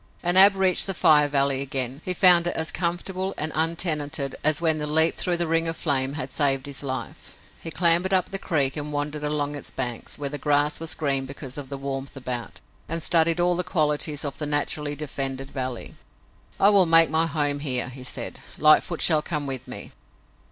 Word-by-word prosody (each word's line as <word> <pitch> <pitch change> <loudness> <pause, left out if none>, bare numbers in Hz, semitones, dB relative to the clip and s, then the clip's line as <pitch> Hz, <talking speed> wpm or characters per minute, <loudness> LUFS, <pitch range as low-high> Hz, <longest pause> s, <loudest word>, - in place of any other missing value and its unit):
And 175 0 +1
Ab 195 +1 +7
reached 190 -1 +4
the 195 - -2
Fire 150 -2 +4
Valley 140 -1 0
again. 135 0 -3
He 185 - -3
found 175 -2 +5
it - - -2
as 160 0 -2
comfortable 185 +3 -3
and 155 +1 -2
untenanted 155 -4 -1
as 155 -1 +3
when 160 -2 +1
the 150 - -4
leap 160 +2 +3
through 175 -2 0
the 170 - +1
ring 165 0 0
of 165 - -3
flame 135 -3 0
had 135 -3 -6
saved 135 -2 0
his 140 -1 -3
life. 130 -2 -6 0.3
He 165 - -6
clambered 170 +3 +2
up 185 -1 +1
the 195 - -2
creek 145 -8 -1
and 150 -1 -4
wandered 150 +1 -4
along 150 -1 -2
its 145 - -7
banks, 120 -3 -4
where 145 - -3
the 145 - -5
grass 145 0 +1
was 165 0 -1
green 135 -3 -1
because 135 -1 -8
of 140 -3 -7
the 140 - -6
warmth 135 0 -6
about, 125 -2 -6 0.3
and 165 0 -2
studied 165 0 +2
all 175 0 +2
the 180 - -2
qualities 150 -4 0
of 140 - -5
the 150 - -3
naturally 145 0 -1
defended 135 -2 -4
valley. 130 -3 -5 0.7
"I 200 - +5
will 195 -4 +4
make 165 -1 +5
my 160 +1 +2
home 145 -2 -1
here," 130 -5 -2
he 130 0 -11
said. 130 - -4 0.2
"Lightfoot 155 +2 +4
shall 155 -3 +5
come 150 -2 -3
with 135 -2 -5
me." - - -8
150 Hz, 205 wpm, -24 LUFS, 140-165 Hz, 0.7 s, Ab